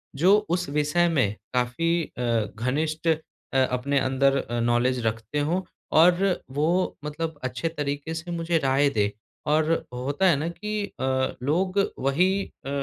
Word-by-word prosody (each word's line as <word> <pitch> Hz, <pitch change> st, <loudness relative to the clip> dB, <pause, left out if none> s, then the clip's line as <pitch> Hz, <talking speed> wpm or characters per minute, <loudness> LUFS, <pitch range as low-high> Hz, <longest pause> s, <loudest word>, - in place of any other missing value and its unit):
जो 185 Hz, +8 st, +5 dB
उस 180 Hz, +1 st, 0 dB
विषय 150 Hz, +4 st, +2 dB
में 120 Hz, -10 st, +1 dB, 0.2 s
काफ़ी 165 Hz, +8 st, +1 dB
अ, 125 Hz, -, -3 dB, 0.3 s
घनिष्ठ 155 Hz, +8 st, -1 dB
अ, 160 Hz, -, +4 dB, 0.5 s
अपने 135 Hz, +3 st, +1 dB
अंदर 135 Hz, +1 st, +2 dB
अ, 120 Hz, -2 st, -2 dB
नॉलेज 120 Hz, +1 st, +1 dB
रखते 115 Hz, +6 st, -2 dB
हो। 170 Hz, +6 st, 0 dB, 0.3 s
और 180 Hz, +4 st, +4 dB
वो 165 Hz, +7 st, +1 dB
मतलब 155 Hz, 0 st, -4 dB
अच्छे 130 Hz, +4 st, -2 dB
तरीके 145 Hz, 0 st, -3 dB
से 165 Hz, +2 st, -5 dB
मुझे 165 Hz, 0 st, 0 dB
राय 140 Hz, 0 st, +3 dB
दे। 105 Hz, -5 st, 0 dB, 0.4 s
और 155 Hz, +1 st, +3 dB, 0.2 s
होता 140 Hz, +9 st, -1 dB
है 165 Hz, -, +5 dB
ना 155 Hz, +4 st, -2 dB
कि 210 Hz, +3 st, -3 dB, 0.2 s
अ, -, -, -3 dB, 0.4 s
लोग 185 Hz, +8 st, +1 dB, 0.2 s
वही 140 Hz, +7 st, +2 dB, 0.4 s
अ, 135 Hz, -, -4 dB
150 Hz, 150 wpm, -25 LUFS, 130-170 Hz, 0.5 s, जो